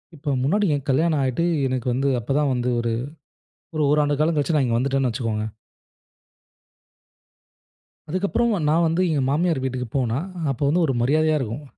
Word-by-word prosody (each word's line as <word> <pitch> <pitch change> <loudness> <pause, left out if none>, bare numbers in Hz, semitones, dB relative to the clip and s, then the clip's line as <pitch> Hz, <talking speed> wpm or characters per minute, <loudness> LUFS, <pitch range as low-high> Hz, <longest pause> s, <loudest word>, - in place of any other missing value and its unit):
இப்போ 145 0 -5
முன்னாடி 205 +10 +2
என் 140 - -6
கல்யாணம் 155 +2 +2
ஆயிட்டு 130 +6 0 0.2
எனக்கு 130 -1 -3
வந்து 135 +3 0
அப்போ 120 - -5
தான் 145 -2 +1
வந்து 125 0 -1
ஒரு 115 0 -1 0.8
1 155 - 0
ஓராண்டு 145 -1 +2
காலம் 160 +2 +2
கழிச்சு 150 +3 +1
நான் 145 -3 +3
இங்க 115 -1 +1
வந்துட்டேன்னு 135 +1 +1
வச்சுக்கோங்க. 110 -3 -2 2.6
அதுக்கப்புறம் 200 +7 0 0.2
நான் 160 +3 +3
வந்து 165 +3 +1
எங்க 150 - +1
மாமியார் 160 -1 +1
வீட்டுக்கு 130 -1 -3
போனா, 125 -2 0 0.3
அப்போ 135 +1 -4
வந்து 170 +5 +2
ஒரு 135 - 0
மரியாதையா 155 +4 +2
இருக்கும். 125 +4 -5
140 Hz, 160 wpm, -23 LUFS, 130-155 Hz, 2.6 s, நான்